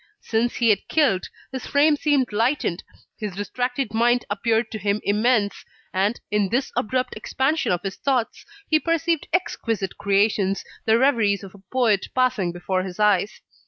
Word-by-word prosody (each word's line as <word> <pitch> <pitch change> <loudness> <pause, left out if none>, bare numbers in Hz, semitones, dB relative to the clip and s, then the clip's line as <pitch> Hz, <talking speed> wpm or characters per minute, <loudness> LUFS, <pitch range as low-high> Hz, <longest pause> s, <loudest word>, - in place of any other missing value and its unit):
Since 230 +2 0
he 235 -2 +2
had 200 - -1
killed, 270 -13 +2 0.2
his 260 -1 -6
frame 295 +2 +4
seemed 280 -6 +1
lightened, 225 - 0 0.4
his 210 -4 -4
distracted 245 +3 -2
mind 240 +2 +2
appeared 220 +2 0
to 215 - -5
him 200 +1 0
immense; 210 0 +1 0.3
and, 200 +5 +1
in 205 -2 +1
this 260 +5 0
abrupt 255 +3 -1
expansion 265 +8 0
of 175 -1 -1
his 195 -1 -4
thoughts, 255 -5 -1 0.2
he 310 - +3
perceived 330 -1 0
exquisite 225 - -2
creations, 200 -1 +1 0.2
the 225 0 +4
reveries 230 -7 +2
of 195 - -10
a 200 - -15
poet 230 -6 +2
passing 250 -8 +1
before 185 +2 -2
his 185 0 -7
eyes. 210 -1 +2
225 Hz, 160 wpm, -23 LUFS, 200-255 Hz, 0.4 s, frame